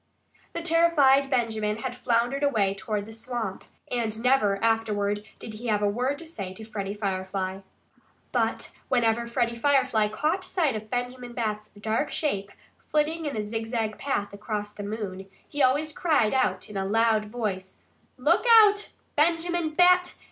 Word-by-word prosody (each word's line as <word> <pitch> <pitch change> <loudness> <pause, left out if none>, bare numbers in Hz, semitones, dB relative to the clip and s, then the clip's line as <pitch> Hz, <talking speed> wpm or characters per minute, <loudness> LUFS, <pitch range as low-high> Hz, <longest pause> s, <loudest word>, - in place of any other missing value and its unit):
The 335 - -4
terrified 310 -5 +4
Benjamin 220 -4 0
had 255 -2 -3
floundered 245 +2 0
away 215 -9 +2
toward 205 +1 -3
the 220 - -10
swamp. 225 -3 -4 0.3
And 225 -2 -2
never, 235 -6 +3
afterward, 210 -2 +1
did 220 - -8
he 230 +3 -7
have 210 -2 +1
a - - +4
word 250 +7 0
to 335 - -9
say 200 - -6
to 220 - -8
Freddie 205 -2 -4
Firefly. 190 -1 -3 0.7
But - - -1
whenever 235 -2 +2
Freddie 235 0 0
Firefly 255 -6 +3
caught 305 - -1
sight 330 - 0
of 215 0 -6
Benjamin 245 0 -4
Bat's 215 -3 -3
dark 220 +7 -1
shape, 200 -10 -2 0.4
flitting 310 +1 0
in 275 - -3
a 210 - -1
zigzag 225 0 -3
path 205 -8 -2
across 210 0 -4
the - - -8
moon, 200 -2 -5 0.2
he 290 - -3
always 290 +4 +2
cried 295 -12 +2
out 190 -8 +1
in 210 - -7
a 195 - -1
loud 220 0 +2
voice: 210 -4 -5 0.3
"Look - - +2 0.2
out, 415 0 +1 0.2
Benjamin 335 +2 +1
Bat! 360 +2 +4
230 Hz, 155 wpm, -26 LUFS, 210-280 Hz, 0.7 s, terrified